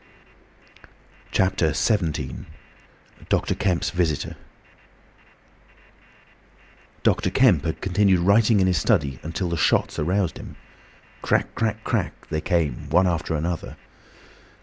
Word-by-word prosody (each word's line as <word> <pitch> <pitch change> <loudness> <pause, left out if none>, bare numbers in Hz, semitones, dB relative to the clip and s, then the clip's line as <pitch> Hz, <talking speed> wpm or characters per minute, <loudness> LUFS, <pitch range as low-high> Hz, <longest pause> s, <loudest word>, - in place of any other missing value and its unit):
CHAPTER 95 -4 +1
XVII. 80 - -1 0.8
DR. - - +1
KEMP'S 90 -4 0
VISITOR 80 -5 -1 2.7
Dr. - - +2
Kemp 110 - +4
had 80 - -3
continued 95 -1 +2
writing 105 +3 +4
in 95 - +3
his 90 -4 +2
study 70 -3 +1
until 85 +3 -3
the 85 - -2
shots - - +1
aroused 90 +4 0
him. - - -10 0.7
Crack, - - 0
crack, 110 -2 -2
crack, - - -3
they 80 - -1
came 80 -8 -1
one 95 - +4
after 80 -3 -1
the 80 - -2
other. 85 -1 -5
85 Hz, 110 wpm, -23 LUFS, 80-95 Hz, 2.7 s, Kemp